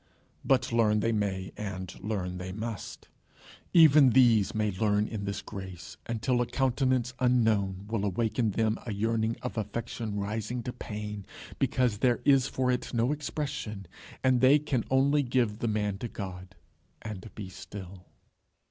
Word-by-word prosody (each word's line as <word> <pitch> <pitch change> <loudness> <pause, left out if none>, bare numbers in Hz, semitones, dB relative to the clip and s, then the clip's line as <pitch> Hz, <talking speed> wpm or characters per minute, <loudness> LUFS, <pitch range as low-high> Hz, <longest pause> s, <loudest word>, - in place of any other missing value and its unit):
But 130 -3 +2
learn 110 -2 +3
they 115 - +1
may, 100 -3 -1
and 95 -3 -5
learn 90 -3 -3
they 90 0 -5
must. 110 -3 -6 0.6
Even 155 -5 +7
these 115 -5 +4
may 105 -1 +1
grow 105 +2 +1
in 105 0 -1
this 100 0 -3
grace 95 -4 -8
until 120 +2 0
a 120 - 0
countenance 130 -1 +1
unknown 110 -6 +2
will 110 -2 -1
awake 105 +4 -1
in 115 -3 +3
them 110 +2 0
a 110 - -2
yearning 110 +2 0
of 125 -2 -3
affection 110 -1 -4
rising 110 +4 -3
to 125 - -4
pain, 105 -2 -6 0.3
because 125 -5 +1
there 120 0 +3
is 135 -2 +5
for 130 -1 0
it 125 -1 -2
no 120 +3 +2
expression, 140 -9 -4 0.4
and 130 -2 +3
they 130 +3 +7
can 140 -5 -1
only 140 +2 +3
give 120 -5 0
the 120 - -1
man 105 -2 -1
to 120 - -3
God 95 -3 -7 0.5
and 110 -1 -7
be 105 -3 -6
still. 95 -1 -10
110 Hz, 155 wpm, -29 LUFS, 100-125 Hz, 0.6 s, Even